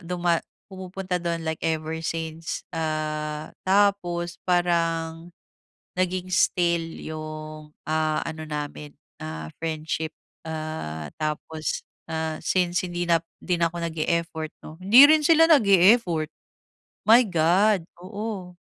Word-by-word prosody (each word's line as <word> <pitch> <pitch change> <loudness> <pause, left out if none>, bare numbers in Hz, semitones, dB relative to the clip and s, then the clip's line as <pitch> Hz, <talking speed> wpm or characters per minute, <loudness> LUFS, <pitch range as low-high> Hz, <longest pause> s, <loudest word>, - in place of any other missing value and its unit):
duma 175 -1 0 0.3
pumupunta 185 -1 -4
do’n 170 -1 -2
like 160 0 -3
ever 160 0 -2
since. 165 0 -4
Ah, 155 -1 -3 0.2
tapos 180 -3 +1
parang 165 -1 +1 0.7
naging 185 0 -1
still 170 -2 +2 0.2
‘yung, 155 -1 -7 0.2
ah, 155 0 +1
ano 160 -1 -5
namin, 150 0 -6 0.2
ah, 80 0 -6
friendship. 160 0 -3 0.3
Ah, 155 - -5
tapos, 155 +1 -3 0.3
ah, 160 -1 -2
since 180 -1 +1
hindi 175 0 -3
na 165 -1 +4 0.2
hindi 180 -1 +1
na 165 - +4
ako - - -8
nag-e-effort, 160 0 -2
‘no, 155 - -10
hindi 230 +9 +9
rin 310 0 +6
sila 325 +1 +6
nag-e-effort. 195 - +5 0.8
My 235 +3 +8
God! 180 +3 +3 0.2
Oo. 200 -2 -6
165 Hz, 110 wpm, -25 LUFS, 155-180 Hz, 0.8 s, hindi